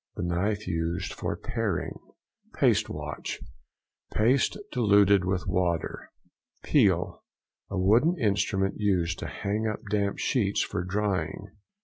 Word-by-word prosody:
—The -, -, -3 dB
knife 100 Hz, +5 st, -1 dB
used 85 Hz, +1 st, -2 dB
for -, -, -3 dB
paring. -, -, -2 dB, 0.6 s
PASTE -, -, +3 dB
WASH.—Paste 75 Hz, -, -2 dB
diluted 100 Hz, -5 st, +4 dB
with 95 Hz, -1 st, -1 dB
water. 85 Hz, -2 st, -1 dB, 0.5 s
PEEL.—A 95 Hz, -, -1 dB
wooden 115 Hz, -, +4 dB
instrument 100 Hz, -4 st, 0 dB
used 90 Hz, -5 st, +1 dB
to -, -, -4 dB
hang 105 Hz, +3 st, -2 dB
up 105 Hz, -, -3 dB
damp 100 Hz, -1 st, 0 dB
sheets 100 Hz, -7 st, +1 dB
for 90 Hz, -3 st, -3 dB
drying. 95 Hz, -1 st, -2 dB
100 Hz, 105 wpm, -27 LUFS, 90-105 Hz, 0.6 s, diluted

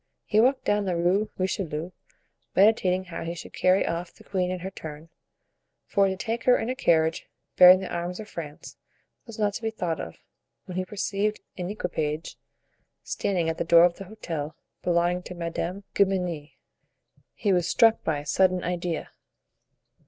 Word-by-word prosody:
He 210 Hz, -, +2 dB
walked 260 Hz, +4 st, +3 dB
down 205 Hz, 0 st, +1 dB
the 185 Hz, -2 st, 0 dB
Rue 185 Hz, +5 st, +1 dB
Richelieu, 180 Hz, -3 st, -2 dB, 0.6 s
meditating 190 Hz, -2 st, +4 dB
how 180 Hz, -3 st, -7 dB
he 170 Hz, +1 st, -4 dB
should -, -, -10 dB
carry 185 Hz, +1 st, +3 dB
off 170 Hz, +1 st, -3 dB
the -, -, -18 dB
queen 185 Hz, -2 st, -1 dB
in 185 Hz, -1 st, -3 dB
her 190 Hz, +2 st, -5 dB
turn, 155 Hz, -2 st, -9 dB, 0.8 s
for 200 Hz, -1 st, +3 dB
to 190 Hz, 0 st, -2 dB
take 225 Hz, +4 st, -3 dB
her 250 Hz, -, +6 dB
in 230 Hz, -, -2 dB
a -, -, -3 dB
carriage 160 Hz, -7 st, +2 dB, 0.3 s
bearing 185 Hz, +1 st, +9 dB
the 190 Hz, -, -6 dB
arms 175 Hz, +1 st, -3 dB
of 215 Hz, -, -7 dB
France 150 Hz, -7 st, -8 dB, 0.5 s
was 230 Hz, -, -9 dB
not 210 Hz, -2 st, +1 dB
to 230 Hz, -, -5 dB
be 225 Hz, -, -1 dB
thought 180 Hz, -7 st, -3 dB
of, 80 Hz, -, -6 dB, 0.5 s
when 180 Hz, -, -8 dB
he 185 Hz, 0 st, -1 dB
perceived 210 Hz, +1 st, -1 dB, 0.2 s
an 180 Hz, -1 st, -4 dB
equipage 160 Hz, -6 st, -3 dB, 0.7 s
standing 180 Hz, -4 st, -1 dB
at 160 Hz, -, -2 dB
the -, -, +1 dB
door 170 Hz, 0 st, +7 dB
of 175 Hz, -1 st, +3 dB
the 195 Hz, -, -8 dB
hotel 165 Hz, -7 st, -5 dB, 0.3 s
belonging 175 Hz, +1 st, +1 dB
to 180 Hz, -, -9 dB
Madame 170 Hz, +2 st, -3 dB
de -, -, +5 dB
Guemenee. 180 Hz, -6 st, -3 dB, 0.8 s
He 200 Hz, -3 st, +1 dB
was 175 Hz, -2 st, +2 dB
struck 225 Hz, -1 st, +4 dB
by 155 Hz, -2 st, 0 dB
a -, -, -13 dB
sudden 185 Hz, +3 st, +2 dB
idea. 175 Hz, -1 st, -3 dB
180 Hz, 175 wpm, -26 LUFS, 170-200 Hz, 0.8 s, bearing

